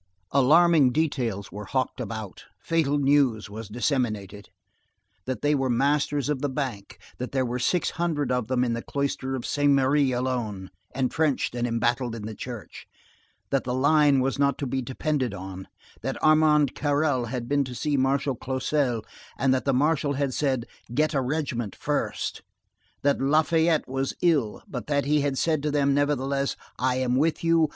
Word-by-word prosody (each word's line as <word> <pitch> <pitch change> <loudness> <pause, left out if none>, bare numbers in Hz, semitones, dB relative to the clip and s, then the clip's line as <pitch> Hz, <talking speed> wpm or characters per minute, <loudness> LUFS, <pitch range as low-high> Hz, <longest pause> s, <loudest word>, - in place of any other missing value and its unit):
Alarming 150 +1 +5
details 125 -9 -1
were 105 0 -7
hawked 130 +6 -2
about, 110 -3 -6
fatal 155 -3 +1
news 135 -7 +2
was 110 +1 -7
disseminated,—that 105 -2 -5
they 145 +1 +3
were 135 -2 0
masters 140 +2 +1
of 145 -3 -1
the 145 - 0
Bank;—that 125 -2 -6
there 130 -1 +1
were 125 +1 -3
six 175 +8 +1
hundred 160 -5 -1
of 125 -3 0
them 125 0 +1
in 120 -2 0
the 115 - -3
Cloister 135 -1 -2
of 125 - -5
Saint 145 -1 +2
Merry 135 0 +3
alone, 120 -7 -2 0.2
entrenched 135 +2 0
and 120 0 -1
embattled 120 +1 0
in 110 - -7
the 110 - -5
church; 120 0 -8 0.6
that 135 - +1
the 125 0 -2
line 145 0 +4
was 135 +2 -1
not 140 -1 +2
to 140 - -3
be 135 +1 -1
depended 130 +1 -2
on; 95 0 -8 0.3
that 135 +5 -3
Armand 155 -2 +4
Carrel 145 -3 +1
had 120 0 -4
been 140 +1 +2
to 125 -1 -7
see 150 +3 -1
Marshal 135 +1 +1
Clausel 130 -1 -1 0.3
and 135 -1 +2
that 130 - -1
the 140 - +3
Marshal 145 +1 +2
had 140 -1 -1
said: 130 -5 0 0.3
"Get 155 +5 +1
a 135 - +1
regiment 125 - -2
first"; - - -2 0.6
that 140 -1 +2
Lafayette 160 +3 +2
was 135 +1 -2
ill, 145 -11 +1
but - - -6
that 145 -2 +1
he 150 +1 +2
had 140 -1 -1
said 155 -1 +1
to 150 - -1
them, 140 -1 +2
nevertheless: 140 -1 0 0.2
"I 130 0 +1
am 130 -1 +1
with 155 +4 +1
you. 165 -2 +3
135 Hz, 170 wpm, -26 LUFS, 125-145 Hz, 0.6 s, Alarming